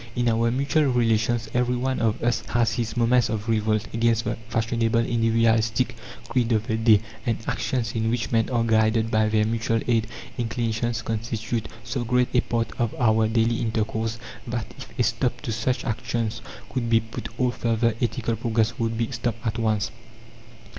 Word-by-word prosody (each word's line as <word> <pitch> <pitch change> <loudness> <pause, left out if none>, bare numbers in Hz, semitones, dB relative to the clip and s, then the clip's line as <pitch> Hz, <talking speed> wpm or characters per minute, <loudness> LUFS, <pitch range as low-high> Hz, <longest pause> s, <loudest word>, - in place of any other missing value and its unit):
In 120 -1 +2
our 115 +1 +2
mutual 140 +5 +2
relations 115 -2 +1
every 125 0 +1
one 130 +1 -1
of 115 -2 0
us 120 0 +1
has 115 -2 +1
his 115 -1 -3
moments 120 0 +3
of 110 0 -3
revolt 110 -1 +1
against 115 0 +2
the - - -1
fashionable 115 0 +1
individualistic 115 +1 +2 0.3
creed 120 -1 0
of 110 0 +1
the 110 - -1
day, 110 -2 +5 0.2
and 115 -1 0
actions 120 -4 -1
in 110 -1 0
which 115 -1 -1
men 115 -2 +2
are 120 -2 +1
guided 110 0 +2
by 110 -1 +3
their 110 0 +2
mutual 115 0 0
aid 115 -2 +2 0.3
inclinations 115 0 -1
constitute 115 0 -3 0.2
so 120 +2 -3
great 125 +1 +2
a 125 - +4
part 115 -1 -1
of 120 -2 0
our 110 -3 +3
daily 115 +1 +2
intercourse 110 0 -1 0.3
that 120 -1 -2 0.2
if - - -19
a - - +4
stop - - 0
to - - -3
such 110 +4 -1
actions 115 -1 -2 0.3
could 120 -3 -2
be 115 -1 +5
put 115 0 -7
all 125 0 +2
further 115 -1 +1
ethical 120 -1 0
progress 115 0 0
would 115 -1 -1
be 115 +2 -1
stopped 115 -1 -3
at 115 0 -1
once. 105 -4 0
115 Hz, 175 wpm, -25 LUFS, 110-120 Hz, 0.3 s, day